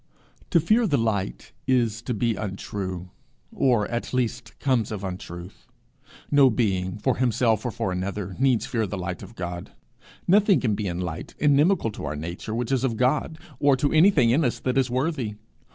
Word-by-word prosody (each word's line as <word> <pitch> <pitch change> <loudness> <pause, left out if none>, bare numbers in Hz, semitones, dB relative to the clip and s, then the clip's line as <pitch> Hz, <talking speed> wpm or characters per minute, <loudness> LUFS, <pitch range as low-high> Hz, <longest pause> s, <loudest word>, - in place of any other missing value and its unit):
To 170 - +4
fear 215 +8 +3
the 145 -6 +2
light 100 - -2 0.2
is 120 -3 +2
to 120 0 -3
be 115 +2 +1
untrue, 95 -3 -5 0.4
or 120 -6 +2
at 120 +1 -3
least 125 0 -1
it - - -28
comes 130 -6 +1
of 100 -2 -5
untruth. 90 -1 -7 0.6
No 140 -2 +6
being, 95 -6 0
for 125 +4 0
himself 115 -3 +2
or - - 0
for 115 -4 -2
another, 95 +1 -3
needs 130 -3 +3
fear 115 -4 -1
the 100 - -4
light 90 -1 -4
of 100 +4 -11
God. 90 -2 -6 0.5
Nothing 200 +1 +5
can 115 -5 +1
be 100 0 -2
in 90 0 -3
light 85 -3 -5
inimical 150 - +3
to 100 - -7
our 75 +1 -3
nature, 85 +8 -5
which 120 +1 -2
is 130 -2 +1
of 120 -4 0
God, 140 +5 +1 0.2
or 140 -2 +4
to 145 +2 0
anything 155 - +5
in 150 +7 +3
us 125 - 0
that 130 - -1
is 130 -2 +1
worthy. 130 -4 -1
115 Hz, 185 wpm, -25 LUFS, 95-130 Hz, 0.6 s, No